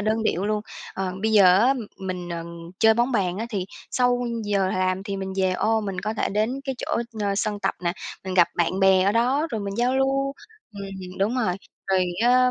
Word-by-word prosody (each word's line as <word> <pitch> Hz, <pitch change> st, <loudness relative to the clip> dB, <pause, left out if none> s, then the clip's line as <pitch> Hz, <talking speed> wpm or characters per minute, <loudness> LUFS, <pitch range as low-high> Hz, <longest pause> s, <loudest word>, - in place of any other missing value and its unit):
đơn 220 Hz, +2 st, 0 dB
điệu 195 Hz, -3 st, 0 dB
luôn. 210 Hz, 0 st, 0 dB, 0.3 s
Ờ, 190 Hz, -1 st, -2 dB
bây 220 Hz, 0 st, +1 dB
giờ 205 Hz, -3 st, +7 dB
á 255 Hz, +5 st, +4 dB, 0.2 s
mình, 180 Hz, -2 st, -5 dB
ờ, 170 Hz, -1 st, -4 dB, 0.3 s
chơi 220 Hz, -1 st, +6 dB
bóng 240 Hz, +3 st, +1 dB
bàn 190 Hz, -3 st, 0 dB
á 230 Hz, -, -2 dB
thì 190 Hz, -5 st, -2 dB, 0.2 s
sau 245 Hz, -1 st, +2 dB, 0.2 s
giờ 200 Hz, -2 st, +1 dB
làm 185 Hz, 0 st, 0 dB
thì 200 Hz, -1 st, -4 dB
mình 190 Hz, 0 st, -4 dB
về 190 Hz, -1 st, +2 dB
ô 220 Hz, +4 st, +1 dB
mình 195 Hz, -3 st, -4 dB
có 215 Hz, +3 st, -3 dB
thể -, -, 0 dB
đến 220 Hz, +7 st, -1 dB
cái 270 Hz, -2 st, -2 dB
chỗ, -, -, -2 dB, 0.2 s
ờ, 200 Hz, -1 st, 0 dB
sân 210 Hz, 0 st, -1 dB
tập 195 Hz, -, 0 dB
nè, 170 Hz, -, +1 dB, 0.3 s
mình 185 Hz, -1 st, -3 dB
gặp 175 Hz, -2 st, +5 dB
bạn 180 Hz, +3 st, +1 dB
bè 190 Hz, -1 st, +5 dB
ở 200 Hz, +2 st, +3 dB
đó 255 Hz, +7 st, +2 dB
rồi 220 Hz, -, -2 dB
mình 200 Hz, 0 st, -4 dB
giao 250 Hz, +2 st, +2 dB
lưu. 275 Hz, +1 st, +1 dB, 0.4 s
Ừm, 195 Hz, -2 st, -8 dB
đúng 210 Hz, +6 st, +1 dB
rồi, 215 Hz, -8 st, +1 dB, 0.3 s
rồi 190 Hz, -1 st, +3 dB, 0.2 s
á 250 Hz, +1 st, +5 dB
205 Hz, 220 wpm, -24 LUFS, 190-235 Hz, 0.4 s, giờ